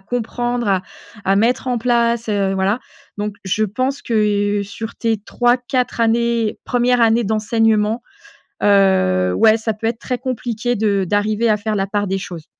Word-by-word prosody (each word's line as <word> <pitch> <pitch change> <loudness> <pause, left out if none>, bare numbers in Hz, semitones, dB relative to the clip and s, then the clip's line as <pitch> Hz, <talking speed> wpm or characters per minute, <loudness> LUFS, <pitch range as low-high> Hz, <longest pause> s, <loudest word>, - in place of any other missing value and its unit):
comprendre 240 +2 -3
à 190 -2 +2 0.4
à 195 +1 +2
mettre 240 +4 +1
en 245 -1 0
place, 235 -1 +1
heu, 200 -2 0
voilà. 195 +5 0 0.4
Donc 205 0 -3
je 195 +3 0
pense 255 +7 -2
que, 205 -2 +1
heu, 200 - -1
sur 220 +3 -7
tes 225 -2 0
3-4 245 +4 0
années, 230 -1 +1
1res 245 0 +1
années 230 +1 +4
d'enseignement, 220 +1 +1 0.6
heu, 140 - +3
ouais, 220 - +4
ça 220 -1 -2
peut 225 +2 -3
être 230 0 -2
très 250 -1 -3
compliqué 245 -2 -2
de 200 -3 +1
d'arriver 210 +4 +1
à 210 - +3
faire 215 +1 -3
la 195 -1 -1
part 205 +1 -1
des 195 0 -2
choses. 170 -4 -8
220 Hz, 165 wpm, -19 LUFS, 205-235 Hz, 0.6 s, années